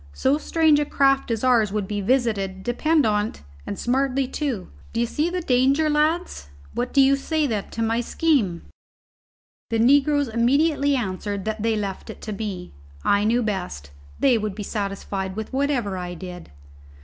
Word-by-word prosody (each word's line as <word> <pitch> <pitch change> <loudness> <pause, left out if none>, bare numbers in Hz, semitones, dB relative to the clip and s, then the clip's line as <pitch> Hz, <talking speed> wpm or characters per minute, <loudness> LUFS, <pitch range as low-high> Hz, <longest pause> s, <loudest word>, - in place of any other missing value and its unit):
So 275 - +1
strange 315 -2 +3
a 295 - +1
craft 275 -2 +2
as 225 0 -2
ours 235 -5 +3
would 205 -2 -2
be 205 0 -2
visited, 200 -5 0
depend 305 +6 +2
on't, 210 - -1 0.2
and 200 - -4
smartly, 265 +1 0
too. 255 - -3 0.2
D'ye 230 +1 +1
see 300 +8 -1
the 360 0 -2
danger, 275 +2 +2
lads? 305 - 0 0.2
What 245 +1 -2
do 280 - +2
you 270 +1 +5
say, 305 +2 -1
then, 215 -7 -2
to 230 - -3
my 225 +1 +1
scheme?" 235 - +1 1.1
The 230 - 0
negroes 285 +4 +4
immediately 280 +5 +2
answered 200 -3 -3
that 220 0 -3
they 225 0 +1
left 200 -3 -4
it - - -8
to 215 - -5
me; 200 -4 -5 0.3
I 200 0 +3
knew 235 +3 +2
best; 180 - -4 0.3
they 255 -4 +4
would 210 -2 -3
be 210 - -5
satisfied 195 -2 -4
with 220 +3 -6
whatever 265 -7 0
I 180 -1 -5
did. 180 0 -9
235 Hz, 170 wpm, -23 LUFS, 205-275 Hz, 1.1 s, you